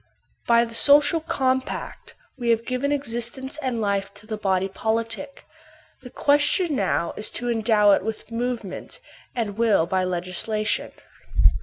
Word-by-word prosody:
By 235 0 +5
the 230 - -10
social 290 +6 +5
compact 260 -5 -2 0.2
we 240 -4 -3
have 230 0 +2
given 255 +3 -1
existence 265 0 -2
and 255 -4 -2
fife 200 -2 -1
to 210 - -14
the 215 0 -4
body 195 -2 0
politic; 225 +7 -3 0.6
the 250 - -10
question 290 +5 +3
now 185 -6 0
is 210 - 0
to 245 0 -1
endow 220 -2 +4
it - - +3
with 220 +1 -6
movement, 230 -4 -4 0.4
and 220 -3 -3
will 215 -8 +3
by 185 +2 0
legislation. 185 +4 -1
230 Hz, 140 wpm, -24 LUFS, 210-260 Hz, 0.6 s, By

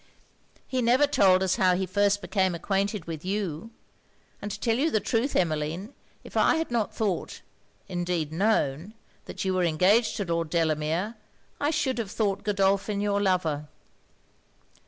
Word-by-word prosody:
'He 260 -1 -1
never 250 +5 +4
told 190 -9 +4
us 185 -1 +1
how 185 -1 +4
he 190 +1 -1
first 205 +2 +1
became 190 -3 +1
acquainted 195 +1 -1
with 160 -2 -6
you; 190 -1 -3 0.7
and 205 - -4
to 205 0 -6
tell 225 +1 +1
you 300 +5 +2
the 220 - +1
truth 230 +6 -1
Emmeline, 165 - -1 0.3
if - - -13
I - - +4
had 325 -4 -2
not 230 -3 0
thought, 205 -5 -3 0.5
indeed 175 -4 -2
known, 185 -1 0 0.3
that - - -6
you 190 - +1
was 180 -1 +2
engaged 190 +8 +3
to 200 - -2
Lord 165 -2 -1
Delamere, 165 +6 0 0.4
I 290 - +1
should 270 -5 0
have 220 -4 -3
thought 200 -2 -1
Godolphin 200 0 +1
your 205 0 0
lover.' 165 -6 0
195 Hz, 155 wpm, -27 LUFS, 170-215 Hz, 0.7 s, never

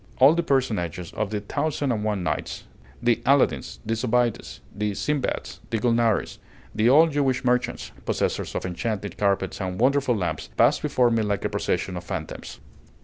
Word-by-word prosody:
All 135 +4 +7
the 170 - +1
personages 105 - -1
of 105 - -2
the 105 0 -2
'Thousand 145 +4 -1
and 105 -3 -1
One 105 -4 -1
Nights,' - - -3 0.4
the 120 -2 +4
Aladdins, 140 +3 +2
the 110 - 0
Zobeides, 120 0 0 0.2
the 105 0 -1
Sindbads, 130 +8 -2
the 115 - 0
Gulnares, 115 -1 +1 0.3
the 110 +2 +3
old 155 +5 +6
Jewish 135 -3 0
merchants, 125 0 0
possessors - - -1
of - - -2
enchanted 105 +2 -3
carpets 100 -1 0
and 95 0 -3
wonderful 130 0 +3
lamps, 90 - -3
passed - - +4
before 125 -2 +2
me 115 -1 +2
like 100 -2 -1
a - - +1
procession 95 - -1
of 90 - -6
phantoms. 85 -4 -6
115 Hz, 165 wpm, -25 LUFS, 100-130 Hz, 0.4 s, All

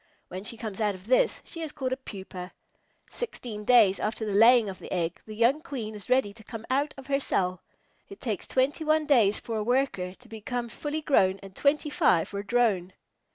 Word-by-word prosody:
When 185 +1 -6
she 230 +2 -1
comes 220 -3 -5
out 205 -2 +1
of 185 0 -14
this, 255 +3 +2
she 330 - -7
is 315 -2 -4
called 260 -4 -3
a - - +1
Pupa. 190 -7 -9 0.6
Sixteen 240 - -6
days 220 -6 +5
after 220 +1 -2
the 210 - -2
laying 230 +2 +6
of 190 -1 -6
the - - -10
egg, 170 -2 -2
the 215 - -7
young 240 +7 +3
Queen 240 -9 -5
is 205 -3 -9
ready 255 -6 +2
to 220 +1 -15
come 225 +1 -8
out 285 +3 +1
of 270 - -10
her 275 0 +1
cell. 185 -8 0 0.5
It 395 - -11
takes 215 -6 -3
twenty 270 +5 +1
one 310 0 +2
days 230 -9 +4
for 225 -1 -4
a 215 - -1
Worker 230 -7 0
to 250 - -19
become 235 +2 -4
fully 295 +6 -4
grown 195 -10 +3
and 195 -1 -11
twenty 295 +1 +1
five 265 - +3
for 200 - -4
a - - -4
Drone. 205 -5 +1
230 Hz, 215 wpm, -27 LUFS, 200-270 Hz, 0.6 s, laying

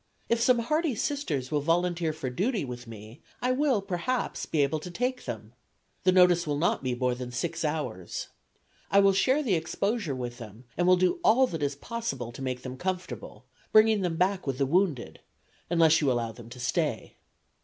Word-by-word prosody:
If 235 0 +2
some 245 +1 +5
hardy 300 +4 0
Sisters 180 - -2
will 150 -1 +1
volunteer 170 +1 +1
for 150 -5 -5
duty 200 - 0
with 120 -1 -8
me 110 +3 -11 0.2
I 250 - +1
will 255 -6 +2
perhaps 200 +7 -2
be 150 -3 +2
able 140 +3 0
to 180 - -8
take 250 +8 -2
them. - - -6 0.5
The 185 - +6
notice 180 -2 +5
will 145 -1 0
not 170 +4 +1
be 130 -2 -1
more 125 0 0
than 125 0 -6
six 165 +7 -3
hours. 150 - -3 0.6
I 200 - +5
will 195 0 +5
share 260 +10 +2
the 225 -8 +1
exposure 180 - -1
with 120 -1 -5
them, 110 +1 -10
and 175 +1 +1
will 185 0 +6
do 185 - +2
all 250 +5 +5
that 165 -10 -5
is 140 -1 0
possible 140 - -4
to 125 - -10
make 130 -1 -3
them 130 0 -6
comfortable, 180 - -5 0.3
bringing 215 -1 +5
them 175 -3 -1
back 185 -1 +1
with 135 -2 -1
the 140 - +2
wounded, 160 -4 0 0.5
unless 165 -2 +4
you 140 -3 +3
allow 120 -2 -1
them 115 0 -12
to 125 +1 -11
stay. 140 0 -2
165 Hz, 195 wpm, -28 LUFS, 130-200 Hz, 0.6 s, The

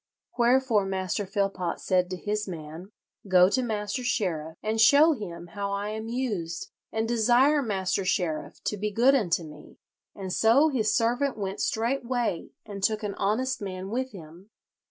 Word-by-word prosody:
Wherefore 240 -4 +3
Master 190 +1 -2
Philpot 195 -3 -1
said 180 -1 +1
to 185 - -4
his 210 +3 -2
man, 165 +2 -8 0.4
'Go 185 -1 +6
to 255 - +1
Master 215 0 -3
Sheriff, 165 -9 -2
and 220 +1 0
show 285 +8 +7
him 175 - -6
how 200 -1 -3
I 200 +1 -2
am 220 +1 -5
used, 220 -9 -3 0.2
and 220 0 -1
desire 240 +6 +4
Master 195 -5 -1
Sheriff 170 -4 -2
to 210 - -2
be 210 +2 -2
good 240 +6 +4
unto 180 -10 +1
me;' 150 -1 -13 0.4
and 190 -2 -5
so 250 +10 +4
his 220 -7 +1
servant 245 +4 +1
went 195 -1 -4
straightway 240 -4 -1 0.2
and 200 -2 -7
took 215 +2 0
an 205 -1 -2
honest 225 +8 -1
man 190 0 -5
with 260 +3 -1
him. 175 +1 -13
210 Hz, 160 wpm, -27 LUFS, 185-240 Hz, 0.4 s, show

